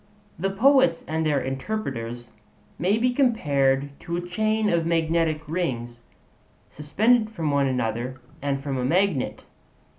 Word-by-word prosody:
The 195 +3 0
poets 230 -3 +3
and 160 +1 -1
their 150 -3 +2
interpreters 130 - -4 0.5
may 190 +6 +2
be 250 +2 +1
compared 145 - +2
to 170 0 -4
a 175 0 -5
chain 215 +4 0
of 170 -4 +2
magnetic 165 -1 +1
rings 120 -8 -3 0.7
suspended 215 +10 +2
from 165 -9 -2
one 140 -1 +2
another, 125 0 -2 0.2
and 140 -1 -2
from 135 -2 -2
a - - -1
magnet. 170 0 0
160 Hz, 130 wpm, -24 LUFS, 135-200 Hz, 0.7 s, poets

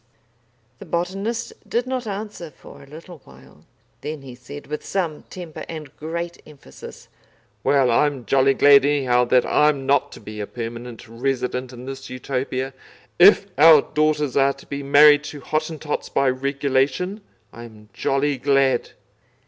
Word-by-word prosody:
The - - -10
botanist 195 +7 -3 0.2
did 240 +1 0
not 255 -2 -4
answer 205 -4 -6
for - - -15
a 140 - -15
little 160 +3 -12
while. 65 0 -18 0.4
Then 150 -2 -6
he 130 -2 -10
said, 130 +4 -11
with 150 +1 -6
some 170 -6 -3
temper 175 -4 -8
and 155 -4 -8
great 170 +2 -5
emphasis: 140 - -13 0.6
"Well, 135 -3 +3
I'm 135 0 +1
jolly 135 0 +3
glad 140 +1 +6
anyhow 130 -4 +2
that 125 +1 +3
I'm 150 -3 +2
not 140 +1 +2
to - - -11
be 105 0 -9
a 105 - -4
permanent 120 0 -7
resident 125 +1 -3
in 125 0 -10
this 135 0 -8
Utopia, 130 +1 -3 0.5
if 195 +2 +7
our 155 -1 +8
daughters 150 -3 +1
are 140 0 +3
to - - -17
be 140 0 -5
married 145 +1 +6
to 150 -1 -8
Hottentots 155 0 -3
by 135 -2 +2
regulation. 140 +8 -1 0.3
I'm 110 -2 -13
jolly 140 0 0
glad." 135 -2 +1
140 Hz, 150 wpm, -22 LUFS, 130-155 Hz, 0.6 s, our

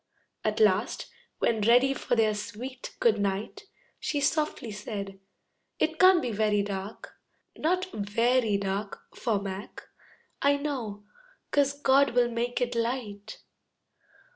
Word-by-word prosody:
At 215 0 0
last, 210 0 +2 0.3
when 225 -2 +1
ready 245 +5 +5
for 245 - -1
their 220 -2 +3
sweet 235 +5 -7
"Good 220 -3 +3
Night," 200 - -2 0.3
She 290 - -1
softly 295 -5 0
said, 200 -2 -6 0.6
"It 320 0 0
can't 370 -2 +7
be 240 - -1
very 210 -1 +2
dark, 200 +1 -6 0.4
Not 365 +4 0
very 225 +2 +1
dark 200 +1 -3
For 225 -5 0
Mac, 195 0 -7 0.6
I 285 0 +4
know, 245 -9 -4 0.5
'cause 285 0 +2
God 275 -2 +4
will 240 -1 +3
make 240 +1 -1
it 245 0 0
light." 230 -4 -3
230 Hz, 125 wpm, -28 LUFS, 205-265 Hz, 0.6 s, can't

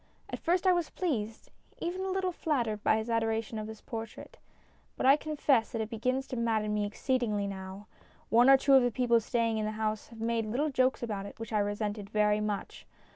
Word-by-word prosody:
At - - -4
first 355 +2 +1
I 370 - +6
was 345 -3 -1
pleased, 225 - -3 0.3
even 355 +2 -3
a 380 - -2
little 375 -1 0
flattered, 240 -11 -1
by 220 - +4
his 220 +1 -3
adoration 225 -1 -1
of 215 - -5
this 220 -1 -9
portrait, 225 -1 -8 0.6
but - - -1
I 270 +1 +8
confess 290 -6 +1
that 225 - -3
it 220 +1 -5
begins 255 +4 -1
to - - -4
madden 220 -3 0
me 210 -1 0
exceedingly 215 -2 -1
now. 190 0 -7 0.4
One 240 +3 +6
or 270 - +9
two 275 +1 +3
of 265 - +8
the 245 - +2
people 240 0 +2
staying 230 0 0
in 215 - -1
the 215 - -2
house 215 -1 -2
have 230 -1 -13
made 225 -1 -1
little 285 +8 0
jokes 255 -1 +1
about 205 -4 -3
it - - -12
which 225 0 -6
I 210 - +3
resented 205 0 -2
very 210 0 +2
much. 210 -2 -4
225 Hz, 215 wpm, -30 LUFS, 215-260 Hz, 0.6 s, or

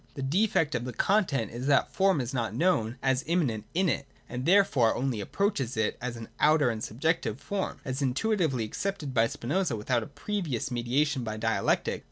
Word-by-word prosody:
The 135 - -4
defect 165 +2 +2
of 120 -1 -1
the 125 0 -5
content 150 - +1
is 120 +3 -5
that 140 -1 +3
the - - -27
form 190 -6 +3
is 125 +2 -4
not 115 -4 -2
known 130 -7 +1
as 130 0 +2
immanent 135 - 0
in 185 +2 +3
it, 140 -4 -1 0.2
and 125 +3 -4
there 200 +3 +7
fore 120 -11 +2
only 125 -5 -1
approaches 135 - -1
it 110 -1 +1
as 120 -1 -4
an 115 - -8
outer 150 -4 +4
and 110 -1 -5
subjective 130 -1 -1
form. 190 +8 -3
As 130 0 -3
intuitively 140 - +1
accepted 155 - -3
by 115 -1 +4
Spinoza 165 +11 -1
without 115 +3 0
a - - -6
previous 145 - -3
me 120 -1 -1
diation 135 +2 +1
by 110 -1 -4
dialectic. - - 0
135 Hz, 200 wpm, -28 LUFS, 120-165 Hz, 0.2 s, there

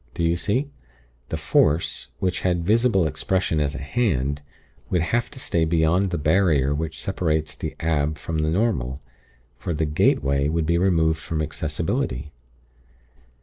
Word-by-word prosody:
Do 85 - -1
you 85 +1 +2
see? 125 - -1 0.6
The - - -2
Force, 80 +3 +1
which 90 -1 -1
had 85 -2 0
visible 110 -3 +3
expression 80 +2 0
as 70 -1 0
a 70 - -5
Hand, 70 - 0 0.5
would 90 -3 +1
have 120 +8 0
to 145 - -12
stay 85 -9 0
beyond 85 +4 +2
the 85 - -2
Barrier 75 -3 +3
which 80 +2 -3
separates 80 -6 -1
the - - -5
Ab 75 -1 0
from 80 +1 -3
the 80 0 +1
Normal; 80 - 0 0.6
for 90 -5 -3
the 80 +1 0
'gateway' 70 -1 +2
would 80 0 0
be 85 +2 +2
removed 80 -4 +2
from 80 -1 -4
accessibility. 75 -2 -2
80 Hz, 150 wpm, -23 LUFS, 75-90 Hz, 0.6 s, visible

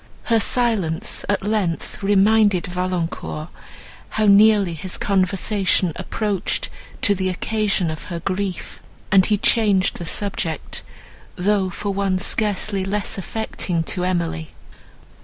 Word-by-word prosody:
Her 230 -1 +3
silence, 210 -9 +1
at 205 - +1
length, 205 -5 -1
reminded 205 -1 +4
Valancourt 175 -3 -3 0.6
how 215 - 0
nearly 205 -2 +5
his 175 +3 -3
conversation 195 -2 +1
approached 210 -4 -2 0.3
to 205 - +5
the 185 -1 -1
occasion 195 -2 0
of 155 - -7
her 170 -2 -5
grief, 190 +1 -4 0.3
and 190 -2 +5
he 210 - +2
changed 200 -3 +2
the 170 - -5
subject, 170 -7 -3 0.5
though 195 0 +1
for 200 +3 -3
one 195 -1 0
scarcely 200 0 0
less 200 +1 -2
affecting 190 -4 -2
to 180 - -2
Emily. 170 -3 -1
195 Hz, 120 wpm, -21 LUFS, 180-210 Hz, 0.6 s, nearly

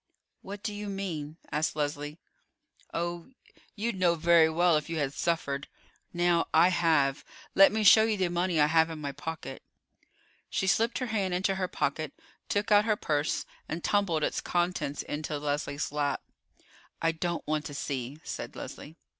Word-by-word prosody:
"What 200 +2 -8
do 215 -2 -2
you 205 0 -5
mean?" 165 -6 -4
asked 150 0 0
Leslie. 145 0 -3 0.7
"Oh, 170 +2 -3 0.5
you'd 225 +3 -1
know 175 -2 +4
very 165 0 +5
well 170 +1 +3
if 150 0 -1
you 165 - -2
had 145 -2 -1
suffered. 140 -5 -1 0.4
Now, 175 -1 +2
I 180 - +7
have. 155 -6 +2 0.3
Let 195 0 +7
me 220 +1 0
show 220 +2 +8
you 220 -2 0
the 185 -2 +1
money 175 -1 0
I 150 - +6
have 160 +1 +3
in 160 - -6
my 145 -2 -4
pocket." 145 -1 -6 0.9
She - - -1
slipped 225 +4 +2
her 255 - -2
hand 190 -4 0
into 190 +2 +1
her 190 -1 -1
pocket, 155 -2 -2 0.4
took 205 +2 0
out 205 0 +6
her 215 -2 +2
purse, 150 -5 -1 0.2
and 165 +1 -4
tumbled 185 -7 +1
its - - 0
contents 175 -5 -1
into 150 0 -4
Leslie's 145 0 -2
lap. 145 -1 -1 0.8
"I 165 - +2
don't 170 +1 -3
want 155 0 -1
to 145 - -6
see," 140 0 -4
said - - -6
Leslie. 155 - -8
165 Hz, 170 wpm, -29 LUFS, 150-190 Hz, 0.9 s, show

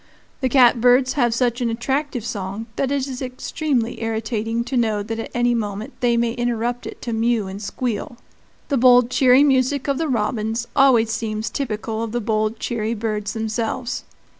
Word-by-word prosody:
The 260 - 0
catbirds 250 0 +5
have 240 -5 +2
such 240 +1 0
an 240 - +1
attractive 255 +1 -2
song 200 0 -4
that 275 0 -1
it 280 -2 0
is 260 -1 -6
extremely 255 -1 -2
irritating 225 0 -2
to 260 +2 -4
know 220 -4 +1
that 225 +2 -4
at 225 - -5
any 240 0 +2
moment 210 -2 -3
they 240 -2 +2
may 235 0 +1
interrupt 240 0 -2
it - - -9
to 235 - -3
mew 225 -2 +1
and 195 +2 -7
squeal. 235 +2 -3 0.5
The 280 - +1
bold, 245 0 +5
cheery 260 0 +5
music 270 0 +2
of 280 0 0
the 325 - 0
robins 225 -1 -1
always 240 -5 +5
seems 220 -1 -3
typical 220 -4 -3
of 230 -1 -4
the 240 - 0
bold, 215 0 0
cheery 225 -1 -2
birds 210 -1 -3
themselves. 225 +2 -3
235 Hz, 175 wpm, -21 LUFS, 220-255 Hz, 0.5 s, catbirds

